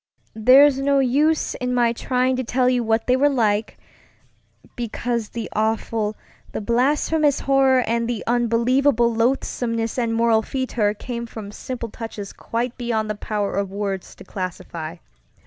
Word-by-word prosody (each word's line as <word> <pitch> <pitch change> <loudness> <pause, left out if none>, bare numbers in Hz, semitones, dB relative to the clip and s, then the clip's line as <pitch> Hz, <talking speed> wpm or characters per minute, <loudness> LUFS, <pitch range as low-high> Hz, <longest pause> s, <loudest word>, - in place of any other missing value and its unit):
There's 265 +5 +6
no 280 0 +2
use 285 +4 +2
in 250 -1 -2
my 235 -1 +3
trying 255 +2 0
to 260 - -1
tell 250 +1 +1
you 250 -1 +2
what 225 0 +1
they 250 - +3
were 285 +3 +3
like, 220 -5 0 1.0
because 235 -1 -3
the 230 -2 -5
awful, 220 0 -1 0.4
the - - -2
blasphemous 285 +6 +1
horror, 270 -2 +3
and 230 0 -1
the 235 -3 -3
unbelievable 240 +1 +2
loathsomeness 230 -1 -1
and 230 -2 0
moral 230 -1 +3
fetor 225 -4 -1
came 235 +1 -5
from 215 -3 -8
simple 235 +1 -6
touches 215 -3 -7
quite 235 +2 -4
beyond 220 -3 -1
the - - -3
power 205 -1 -3
of 200 -1 -1
words 195 -2 -4
to - - -13
classify. 170 -3 -6
235 Hz, 145 wpm, -22 LUFS, 220-255 Hz, 1.0 s, There's